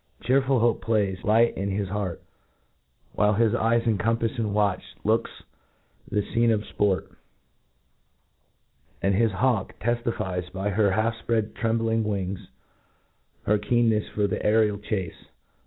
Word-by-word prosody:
Chearful 130 +2 +2
hope 115 0 +2
plays, 100 -5 0
light 115 +2 +3
in 100 +1 -2
his 100 0 -2
heart, 100 -4 -3 0.9
whHe 105 -1 +2
his 115 -1 +3
eyes 115 0 +2
encompafs 115 +2 0
with 115 -3 -1
watchful 100 -2 -1
looks 110 +2 +1 0.8
the 105 - 0
fcene 115 +2 +1
of 110 -2 +1
fport 100 -2 0
i - - -26 1.9
and 100 - +3
his 110 +3 +2
hawk 110 +1 0
teftifies, 110 -6 -2
by 95 +2 -2
her 100 +1 +3
half 110 +4 +1
fpread 110 -2 0
trembling 115 0 0
wings, 100 -3 -3 1.0
her 105 0 +2
keen 115 +2 +2
nefs 105 -1 -1
for 105 - 0
the 100 - -2
aerial 105 -1 +3
chace. 95 -5 -4
110 Hz, 140 wpm, -25 LUFS, 100-115 Hz, 1.9 s, light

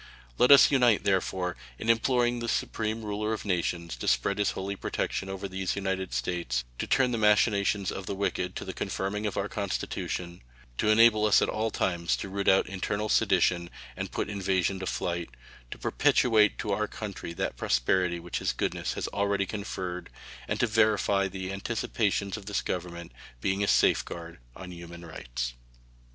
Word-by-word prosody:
Let 125 - +5
us 140 0 +9
unite, 125 -7 +4
therefore, 95 -2 0 0.2
in - - -6
imploring 120 +1 +2
the 115 0 -3
Supreme 110 0 -1
Ruler 105 +1 -2
of 110 - -5
Nations 85 -4 -1
to - - -5
spread 100 +1 +2
his 105 - +1
holy 100 +1 -4
protection 95 0 -3
over 95 0 -4
these 95 -1 -2
United 95 -1 -2
States; 85 -9 -1 0.2
to - - -2
turn 130 -2 +3
the 115 - -1
machinations 105 -2 +3
of 95 - -6
the 100 - -2
wicked 90 -2 -2
to - - -5
the - - -5
confirming 105 +2 -2
of 100 - -4
our 100 - 0
Constitution; 90 -3 -4 0.4
to 110 - +2
enable 110 -1 +6
us 105 - +6
at - - 0
all 110 +1 0
times 85 -5 0
to 100 - -5
root 100 +1 -3
out 95 - +5
internal 100 +3 -3
sedition 85 -4 +2 0.3
and - - -5
put - - -2
invasion 95 -2 0
to 95 - -4
flight; 85 -1 -2 0.4
to - - -7
perpetuate 110 -4 +3
to 105 - -3
our 105 +2 0
country 100 -6 -6
that 80 - -2
prosperity 85 +10 +1
which 85 +1 -4
his - - 0
goodness - - -2
has - - -3
already 100 -1 0
conferred, 95 -3 -5 0.4
and - - -2
to - - +4
verify 110 -3 +2
the 95 0 -5
anticipations 100 -1 -1
of 100 -2 -11
this 105 - -1
Government 85 -1 -4 0.3
being 95 +9 0
a - - +1
safeguard 85 -4 +1 0.2
of 90 -1 -9
human 85 0 -10
rights. - - -5
100 Hz, 175 wpm, -28 LUFS, 90-105 Hz, 0.4 s, us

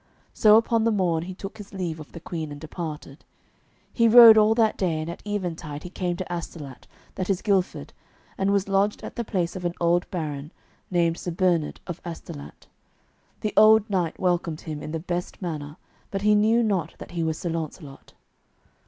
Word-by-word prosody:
So 215 0 +6
upon 230 0 +2
the 230 - +3
morn 175 -5 0
he 185 0 -7
took 195 +3 -8
his 205 -1 -10
leave 170 -4 -3
of 155 - -11
the 170 - -9
Queen, 160 -2 -5
and 145 - -8
departed. 155 -2 -7 0.7
He 230 -1 +4
rode 230 -1 +10
all 215 +1 +5
that 225 -2 +3
day, 170 -5 -1
and 155 - -4
at - - -10
eventide 165 -7 -4
he 180 - -8
came 180 -2 -2
to 185 - -4
Astolat, 165 -6 -7 0.3
that 185 - -4
is 190 -2 0
Gilford, 190 - 0 0.4
and 195 +1 0
was 200 -1 +1
lodged 200 +1 +1
at - - -7
the 235 - -2
place 180 -6 -2
of 185 - -6
an 175 0 -2
old 175 +1 +1
baron, 150 -4 -4 0.4
named 170 -2 +1
Sir - - -4
Bernard 170 -3 0
of 175 -2 -7
Astolat. 75 - -9 0.8
The 215 - -2
old 215 0 +6
knight 175 -4 -1
welcomed 175 -3 0
him 155 -3 -6
in - - -6
the 160 - -2
best 175 +1 -4
manner, 150 -4 -5 0.3
but 195 0 -4
he 210 0 +5
knew 220 +3 +4
not 185 -8 -1
that - - -10
he 175 -1 -3
was 160 -1 -1
Sir 170 - -3
Launcelot. 155 -3 -7
175 Hz, 195 wpm, -25 LUFS, 160-200 Hz, 0.8 s, rode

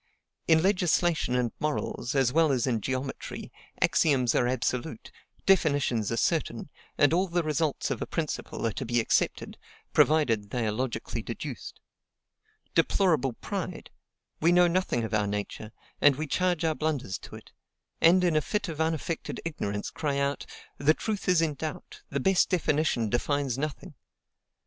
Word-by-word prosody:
In 160 0 +5
legislation 175 -7 +2
and 125 -2 +1
morals, 150 -3 -2
as 130 -2 +2
well 160 -1 +4
as 125 -3 +1
in 120 -4 0
geometry, 130 +3 -4 0.3
axioms 130 -7 +3
are 120 - +2
absolute, 125 0 -2 0.3
definitions 145 - +2
are 115 - -1
certain; - - -1 0.3
and 145 +2 +4
all 185 +3 +2
the 175 -1 0
results 155 -2 -1
of 125 - -3
a - - -3
principle 155 -6 -3
are 115 - +1
to 130 - -5
be 120 0 +1
accepted, 115 - 0 0.3
provided 115 -10 +3
they 120 +1 -1
are 105 - 0
logically 120 +2 -3
deduced. - - -7 0.9
Deplorable 155 -10 +2
pride! - - -5 0.5
We 165 +2 +4
know 175 0 +6
nothing 170 -9 0
of 110 - -4
our 105 -1 +2
nature, 105 +1 -4 0.3
and 145 -2 +6
we 155 +3 -3
charge 175 +2 0
our 160 - +2
blunders 150 -11 -2
to - - -11
it; - - -13 0.5
and, 180 +3 +6
in 175 -3 +2
a 155 - +4
fit 210 +4 -2
of 160 -1 -4
unaffected 160 0 -2
ignorance, 105 -11 -3
cry 145 -3 -2
out, 140 0 -1 0.3
"The 155 +2 +4
truth 210 -3 -3
is 175 -2 +4
in 155 -2 0
doubt, 155 +2 -7
the 140 - -2
best 190 +6 +3
definition 155 - +1
defines 140 +1 0
nothing!" 150 +4 -5
145 Hz, 160 wpm, -28 LUFS, 125-165 Hz, 0.9 s, know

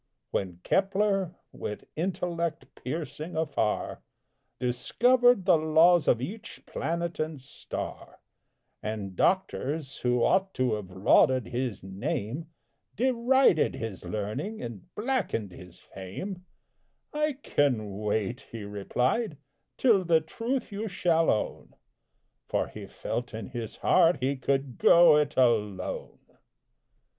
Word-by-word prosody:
When 90 -3 -3
Kepler, 195 -2 +1 0.2
with 105 - -6
intellect 170 -2 -2
piercing 155 +3 -5
afar, 145 -9 -1 0.6
Discovered 245 - +3
the 180 -4 +5
laws 160 +2 +5
of 115 - +4
each 210 - -7
planet 170 +1 -3
and 155 -2 -2
star, 135 +2 -7 0.6
And 105 -3 -4
doctors, 155 - 0
who 125 -1 +1
ought 190 0 +2
to 130 -3 +1
have 105 -3 -4
lauded 110 +6 +3
his 120 -5 -3
name, 105 - -3 0.5
Derided 250 - +3
his 115 -4 -6
learning 110 - -4
and 115 -6 -7
blackened 210 - -1
his 90 0 -12
fame, 100 - -8 0.7
"I 300 0 +1
can 125 - 0
wait," 105 +4 -2
he 115 -2 -6
replied, 125 - -1 0.4
"till 220 -7 +4
the 165 -2 +4
truth 230 +11 -3
you 210 +2 -3
shall 170 -4 +2
own;" 105 - -2 0.7
For - - 0
he - - -9
felt 120 -1 -4
in 110 - -6
his 120 -4 -6
heart 175 -1 +4
he 135 +2 0
could 135 -1 -1
"go 170 -3 +7
it 150 0 0
alone!" 105 -7 0
150 Hz, 115 wpm, -28 LUFS, 110-185 Hz, 0.7 s, go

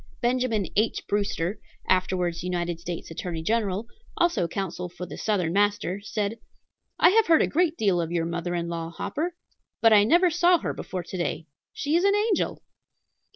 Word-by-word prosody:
Benjamin 240 -4 +1
H. 215 +2 +1
Brewster, 200 -2 -1 0.3
afterwards 180 -2 +1
United 175 -2 -2
States 170 -1 -6
Attorney 165 0 -4
General, 210 0 0 0.3
also 345 - +2
counsel 180 0 -4
for 180 +1 -7
the - - -8
Southern 185 -6 0
master, 205 -1 +1
said: 210 +1 -3 0.6
"I 350 - +6
have 445 +1 +4
heard 325 -1 +5
a - - +1
great 330 0 +1
deal 195 -5 +2
of 165 0 -4
your 170 -1 0
mother 175 +1 -3
in 170 0 -2
law, 165 -1 -4
Hopper; 315 - -3 0.4
but 225 -1 +6
I 205 -1 +7
never 345 - +4
saw 350 +2 +4
her - - -3
before 185 -1 -5
to 180 +2 -7
day. 170 -1 -2 0.3
She 290 +2 -1
is 345 - +3
an 400 +1 +4
angel." 415 -1 0
200 Hz, 175 wpm, -26 LUFS, 175-255 Hz, 0.6 s, I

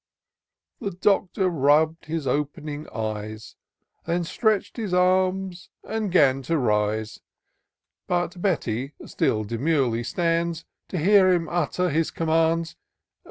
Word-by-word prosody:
The 200 - -3
Doctor 195 0 +1
rubb'd 155 0 +2
his 160 -2 -3
op'ning 145 +2 -3
eyes, 110 0 -5 0.5
Then 170 +1 0
stretch'd 215 +5 0
his 210 -6 -2
arms, 185 0 +1
and 220 -3 -3
'gan 135 -6 +4
to 165 +5 -1
rise: 105 -3 0 0.9
But 175 0 -1
Betty 135 - -1
still 110 -1 0
demurely 120 +1 0
stands. 170 +2 -1 0.2
To 185 - -4
hear 190 +3 +5
him 170 -2 +1
utter 175 +1 0
his 160 +2 +1
commands. 165 0 0
165 Hz, 115 wpm, -24 LUFS, 135-180 Hz, 0.9 s, hear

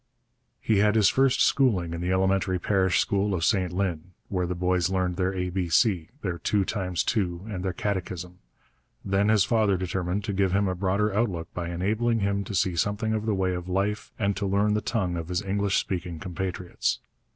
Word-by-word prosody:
He 110 -3 +2
had 105 +1 +3
his 105 -4 +5
first 135 -1 +3
schooling 100 -12 +2
in 85 - -4
the 90 +1 -1
elementary 95 0 +2
parish 95 0 +2
school 100 0 +1
of 85 -2 0
St 95 -5 +1
Lin, 90 -2 -2 0.2
where 90 -2 -1
the 90 - -2
boys 90 0 +1
learned 90 -2 0
their 95 0 0
A 90 -1 -2
B 90 -1 -2
C, 90 -3 +2
their 90 -3 -2
two 100 -2 +1
times 90 -4 -1
two, 90 -4 -1
and 95 -4 -4
their 95 - 0
catechism. 90 -2 -4 0.7
Then 100 +2 +2
his 110 -3 +5
father 105 -3 +2
determined 90 +2 -2
to 105 -1 -3
give 95 -1 +1
him 100 0 +2
a 95 - 0
broader 100 +3 0
outlook 95 -7 -1
by 85 -1 -4
enabling 110 +6 0
him 100 0 0
to 100 - -5
see 90 0 +1
something 105 +6 0
of 110 0 -2
the 105 - +2
way 95 -1 0
of 90 0 -5
life 100 +3 -1
and 100 -2 0
to 100 - -1
learn 100 +2 +2
the 105 - +1
tongue 95 -5 -1
of 85 -1 -4
his 90 +2 -2
English 100 0 0
speaking 90 -2 -3
compatriots. 90 0 -3
95 Hz, 205 wpm, -26 LUFS, 90-105 Hz, 0.7 s, his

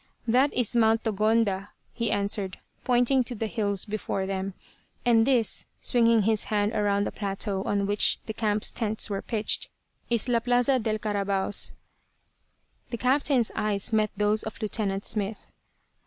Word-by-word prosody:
"That 255 +5 +3
is 245 -1 +1
Mt. 225 -1 +3
Togonda," 215 -2 +1 0.3
he 230 -2 -1
answered, 200 -2 -2 0.3
pointing 250 +1 +3
to 245 - -6
the 225 - -2
hills 205 -3 -1
before 205 -2 -3
them, 190 0 -3 0.5
"and 230 -1 +4
this," 245 -5 +1
swinging 230 -3 +3
his 220 0 +1
hand 210 0 0
around 205 -2 +1
the - - -3
plateau 195 -1 -3
on 200 -1 0
which 205 +1 +2
the 220 - -5
camp's 215 -1 +1
tents 220 -2 0
were 195 - -2
pitched, 215 -2 0 0.4
"is 235 0 +1
La 240 -2 +2
Plaza 245 +2 +2
del 215 -1 -1
Carabaos." 200 -2 -1 1.2
The 235 - -4
captain's 255 -1 +2
eyes 210 0 -1
met 215 -1 +2
those 210 +1 +1
of 220 - -7
Lieutenant 205 -2 -2
Smith. 210 0 -3
215 Hz, 150 wpm, -26 LUFS, 205-230 Hz, 1.2 s, and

